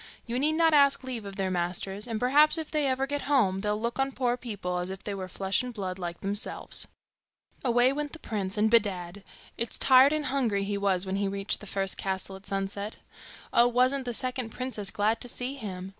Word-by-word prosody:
You 240 +1 -2
need 300 +3 +2
not 325 0 +3
ask 280 -2 +5
leave 245 -5 -4
of 200 -1 -7
their 190 -2 -1
masters; 185 +4 -2
and 225 -2 -2
perhaps 290 +7 +5
if 320 -2 -5
they 300 -2 +1
ever 265 0 +1
get 285 +1 -2
home, 200 -10 +3
they'll 210 0 -1
look 235 +3 -3
on 270 0 0
poor 245 -2 +1
people 200 -7 -4
as 180 +1 -3
if 190 +1 -7
they 205 - -4
were 190 -1 -5
flesh 190 +1 0
and 250 0 -5
blood 190 -4 -5
like 170 -1 -5
themselves.' 200 +1 -3 0.8
Away 245 +1 +4
went 295 0 -3
the - - -7
prince, 205 -8 -3
and 215 +1 +3
bedad! 200 -4 +1 0.4
it's 235 - -2
tired 265 +1 +7
and 305 -1 0
hungry 245 -8 0
he 200 +1 -2
was 195 -2 +1
when 190 +1 -2
he 200 0 0
reached 195 0 -1
the 210 - -10
first 195 -1 -1
castle, 190 0 -3
at 190 +1 -12
sunset. 200 +2 -3 0.6
Oh, 240 - +6
wasn't 255 +2 +2
the 245 - -2
second 255 -1 0
princess 225 -5 -3
glad 215 +2 0
to - - -2
see 245 +2 -2
him! 190 -8 -6
215 Hz, 220 wpm, -28 LUFS, 195-255 Hz, 0.8 s, tired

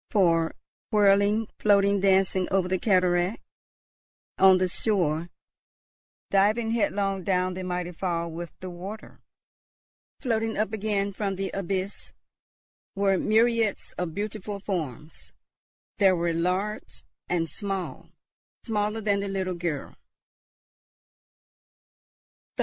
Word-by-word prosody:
For, 165 -5 +2 0.3
whirling, 205 +1 +4
floating, 200 -1 +4
dancing 190 -1 +3
over 190 -1 +1
the 185 0 0
cataract, 180 0 +2 1.0
on 190 -1 +7
the 185 0 +1
shore, 175 -5 0 1.0
diving 215 +4 +3
headlong 200 -4 0
down 185 -1 +1
the 185 - -5
mighty 180 -1 -3
fall 170 -1 -2
with 170 +1 -6
the 185 - -5
water, 195 +5 -9 1.0
floating 225 -3 -1
up 215 0 0
again 200 -2 -1
from 195 -1 -2
the 195 0 -3
abyss, 195 +1 -3 0.8
were 195 -1 +2
myriads 225 -1 +2
of 175 -3 -4
beautiful 205 0 -4
forms. 160 - -5 0.7
There 190 -2 +5
were 170 -1 0
large 185 +5 -2 0.3
and 170 -2 +1
small, 195 0 -5 0.5
smaller 215 -1 -1
than 200 -1 +1
the 200 - -3
little 190 -1 -2
girl. 170 -5 -4
195 Hz, 105 wpm, -26 LUFS, 180-205 Hz, 1.0 s, on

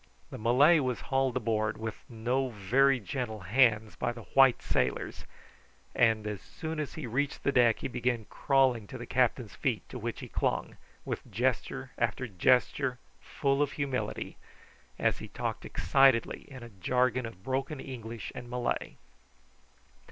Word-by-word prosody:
The - - -7
Malay 135 +9 +5
was 130 -3 -1
hauled 135 -1 +2
aboard 110 -2 0
with 110 -1 -4 0.2
no 125 +3 -1
very 125 +6 +3
gentle 110 0 -4
hands 110 +1 +3
by - - -1
the 120 -1 -9
white 135 -2 +6
sailors, - - -1 0.7
and 110 -3 +3
as 105 -2 -4
soon 160 0 -6
as 150 - -4
he 155 - -5
reached 135 +5 -2
the 140 - +2
deck 120 -4 +4
he - - -1
began 120 -3 -1
crawling 130 -6 +2
to 130 - -7
the 120 - -7
captain's 125 -4 +1
feet, - - -2
to - - -6
which - - -4
he - - -7
clung, - - -1 0.3
with - - -5
gesture 65 - -1
after 130 - 0
gesture 125 +5 +2 0.2
full 140 0 0
of 145 -1 +1
humility, 135 -3 -3 0.6
as - - +1
ha - - -7
talked - - -3
excitedly 135 -4 +3
in 130 -3 -10
a 120 - -9
jargon 125 +5 0
of 95 -5 -12
broken 135 +3 -2
English 115 -4 -7
and 120 - -8
Malay. 125 0 -2
125 Hz, 155 wpm, -30 LUFS, 110-135 Hz, 0.7 s, white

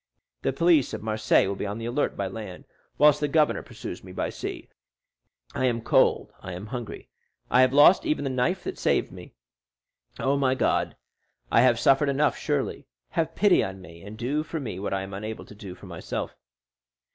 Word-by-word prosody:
The - - 0
police 160 -1 +3
of - - -8
Marseilles 110 -2 +2
will 100 - -2
be 100 - -4
on 100 +2 -4
the 115 - -6
alert 120 +5 -1
by 100 - -1
land, 95 -1 -7 0.3
whilst 150 0 +5
the 150 - 0
governor 150 +1 +2
pursues 110 -6 -8
me 95 - -11
by - - -3
sea. - - -6 0.9
I 130 - 0
am 120 -2 +1
cold, - - +2
I 90 - -7
am 90 +4 -7
hungry. 120 -1 -7 0.4
I 125 - +6
have 130 0 +4
lost 145 +7 +6
even 150 - -1
the 135 - -2
knife 160 +9 0
that - - -5
saved - - +1
me. - - -12 0.8
Oh, 140 +1 +1
my 130 -2 +2
God, - - 0 0.6
I 115 - +5
have 120 -2 +4
suffered 135 +3 +4
enough 145 +2 +2
surely! - - -2 0.2
Have 165 0 -2
pity 205 -3 +4
on 95 0 -5
me, 85 -2 -13
and 105 +3 -10
do 130 +6 -1
for 160 +1 -5
me 115 -10 -5
what 100 - -3
I 95 0 -1
am 95 0 -8
unable 110 +3 -6
to - - -13
do 100 -3 -9
for 100 - -14
myself." 85 -3 -5
120 Hz, 200 wpm, -26 LUFS, 100-145 Hz, 0.9 s, I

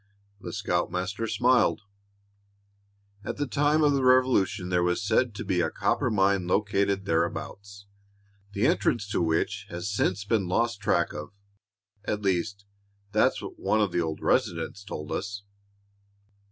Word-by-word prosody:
The - - -7
scoutmaster 95 +1 -2
smiled. 120 +4 +2 1.4
"At - - -5
the 145 - -1
time 145 +3 +2
of 145 -1 +4
the 135 -1 +1
Revolution 125 -7 +3
there 90 -1 +2
was 90 +4 0
said 110 +1 +1
to 115 - -6
be 90 -2 +1
a - - +1
copper 125 - 0
mine 95 -3 +2
located 100 0 +1
thereabouts, 100 +4 -3 0.7
the 100 +4 0
entrance 120 -4 +1
to 100 - 0
which 80 -1 -1
has 90 +4 -4
since 100 0 0
been 100 -3 +1
lost 115 +3 0
track 90 -4 +1
of. 75 0 -6 0.7
At 105 0 -3
least, 100 +2 -1 0.5
that's - - +2
what - - -8
one 110 - +1
of 105 -3 +1
the 85 - 0
old 80 -2 -3
residents 100 - 0
told 75 -6 -7
us." 100 +1 -4
100 Hz, 145 wpm, -27 LUFS, 90-110 Hz, 1.4 s, of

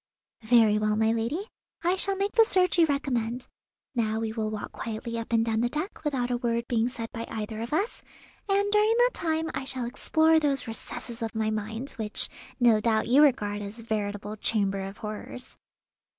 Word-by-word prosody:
"Very 220 -2 +5
well, 215 0 +1
my 220 +1 +3
lady, 235 - -1 0.4
I 350 +2 +3
shall 390 +1 0
make 400 +1 -1
the 455 - +6
search 370 -5 +2
you 330 - +6
recommend. 250 -4 -1 0.5
Now 220 -3 0
we 225 -1 -2
will 220 -1 -2
walk 215 -1 -5
quietly 230 +1 -4
up 230 - -7
and 225 -1 +3
down 225 -1 +1
the 240 - +1
deck 310 - -4
without 260 -5 -1
a 245 - +1
word 235 -1 -1
being 235 -1 +1
said 230 -2 -6
by 230 -1 -5
either 220 0 -4
of 235 - -5
us, 390 +10 -1 0.5
and 400 +1 +2
during 425 +2 +4
that - - +5
time 320 -1 -1
I - - -3
shall 260 -2 -4
explore 315 +6 +3
those 285 -3 0
recesses 230 +1 -5
of 225 0 -3
my 220 0 0
mind, 220 +5 -3
which 215 -2 0 0.3
no 235 -3 +5
doubt 220 0 +1
you 270 +4 +6
regard 210 -8 +3
as 205 +3 -6
veritable 210 -2 -3
'chambers 195 -3 0
of 195 - -12
horrors. 215 +3 -7
235 Hz, 195 wpm, -27 LUFS, 220-295 Hz, 0.5 s, the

